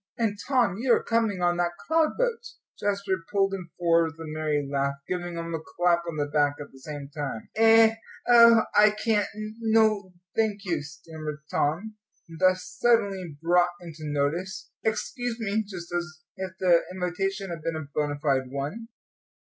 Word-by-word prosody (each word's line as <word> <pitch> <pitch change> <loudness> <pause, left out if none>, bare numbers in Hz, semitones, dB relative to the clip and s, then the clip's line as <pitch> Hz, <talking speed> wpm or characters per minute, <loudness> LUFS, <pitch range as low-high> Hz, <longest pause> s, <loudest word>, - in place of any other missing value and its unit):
"And, 225 -4 0
Tom, 240 -8 +2
you 245 0 +3
are - - -2
coming 225 -5 0
on 175 0 +2
that 175 0 0
cloud 320 -1 +2
boat." 485 -2 0 0.4
Jasper 200 -3 -1
pulled 195 -1 +2
him 185 -3 -5
forward 170 -1 +3
with 160 0 -7
a - - -5
merry 150 -2 -1
laugh, 140 0 0
giving 175 -1 -3
him 170 0 -4
a 160 - -1
clap 175 +2 +1
on 160 - -5
the 145 - +1
back 145 0 +1
at 145 - -8
the 135 - -16
same 145 0 -7
time. 140 -7 -5
"Eh 225 0 +6 0.3
oh, 235 -2 +8
I 210 0 +6
can't 210 -3 +2 0.3
no, 220 -3 +2 0.2
thank 210 -3 0
you," 175 -4 -1
stammered 155 0 -8
Tom, 195 +9 -1 0.4
thus 185 0 +3 0.2
suddenly 200 -9 +2
brought 175 +1 +4
into 165 -3 -9
notice. 165 +7 -2
"Excuse 230 +2 -2
me," 220 0 0
just 175 -3 -8
as 175 0 -4
if 190 -1 -5
the 175 -2 +5
invitation 190 +1 -2
had 165 -2 -6
been 165 +1 -2
a 155 -2 -4
bona 145 -1 -1
fide 135 -4 +1
one. 145 - -5
180 Hz, 170 wpm, -26 LUFS, 155-215 Hz, 0.4 s, oh